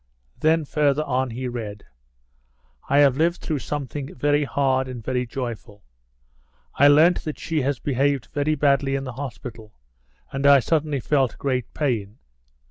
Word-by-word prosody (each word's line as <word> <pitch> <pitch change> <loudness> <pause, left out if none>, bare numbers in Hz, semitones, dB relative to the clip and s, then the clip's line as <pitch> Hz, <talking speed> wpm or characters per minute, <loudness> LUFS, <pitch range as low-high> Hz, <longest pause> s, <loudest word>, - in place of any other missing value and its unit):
Then 160 0 +2
further 145 0 +1
on 130 -2 -1
he 125 +2 -4
read. 110 -4 -6 1.1
"I 140 - +3
have 135 -2 +4
lived 170 +2 +1
through 155 -3 -3
something 140 -1 -5
very 145 +2 +1
hard 130 0 +1
and 125 -3 -7
very 125 -1 -1
joyful. 115 -4 -6 0.9
I 140 - +5
learnt 155 +5 +5
that 155 - -5
she 160 -2 -2
has 140 0 0
behaved 140 -1 0
very 150 +1 +1
badly 140 -1 +2
in 135 - -2
the 130 -2 -6
hospital, 120 -4 -8 0.6
and 135 +1 0
I 140 -1 +8
suddenly 150 0 0
felt 135 -3 +1
great 130 -3 -2
pain. 115 -8 -2
135 Hz, 150 wpm, -23 LUFS, 125-145 Hz, 1.1 s, I